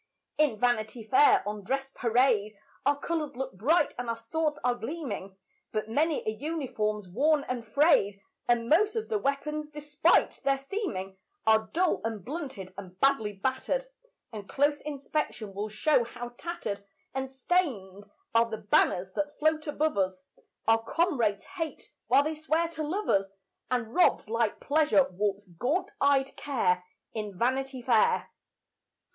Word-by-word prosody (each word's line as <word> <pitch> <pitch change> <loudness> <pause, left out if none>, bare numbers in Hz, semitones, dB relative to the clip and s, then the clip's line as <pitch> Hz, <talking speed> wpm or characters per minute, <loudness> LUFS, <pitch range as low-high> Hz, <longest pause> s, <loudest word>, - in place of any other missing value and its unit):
In 295 -8 +3
Vanity 230 -1 0
Fair, 405 - +5
on 210 -1 -4
dress 270 +5 -2
parade, 225 -4 +2 0.3
Our 285 0 +3
colours 305 -2 -3
look 265 +1 -4
bright 290 - +2
and 245 -1 -3
our 230 - -1
swords 300 +6 -1
are 250 0 +3
gleaming; 240 - -5 0.3
But 215 0 -2
many 305 +5 +1
a - - +2
uniform's 220 - -2
worn 285 - +2
and 250 -2 -3
frayed, 225 - +3 0.3
And 235 -1 +2
most 410 - +4
of 450 0 -2
the 435 -2 +1
weapons, 300 0 -2
despite 300 +2 +2
their 275 0 +3
seeming, 270 - -4 0.3
Are 220 0 +4
dull 360 +1 +1
and 220 -4 -4
blunted 260 - -6
and 185 -1 -11
badly 270 -7 +3
battered, 260 - -1 0.5
And 205 -2 -8
close 290 +1 +2
inspection 280 -7 -3
will 205 +2 -3
show 245 +5 +3
how 240 +1 -7
tattered 240 -7 -5 0.3
And 265 0 -3
stained 245 - -1 0.2
are 230 0 +4
the 220 - -3
banners 195 -3 +2
that 295 +4 -3
float 310 0 +1
above 295 -5 0
us. 185 -1 -1 0.4
Our 225 0 +5
comrades 240 - +1
hate, 330 -5 -6 0.2
while 280 - +5
they 310 +2 -1
swear 315 +2 0
to 330 -2 -6
love 365 +8 -2
us; 195 0 +2 0.4
And 240 -2 -1
robed 350 -11 +3
like 230 -2 +1
Pleasure 295 -1 +3
walks 200 +2 -1
gaunt 245 - -1
eyed 275 -1 +3
Care, 180 -10 0 0.3
In 210 -4 -5
Vanity 260 +2 -1
Fair. 235 -3 +3
260 Hz, 150 wpm, -29 LUFS, 215-305 Hz, 0.5 s, Fair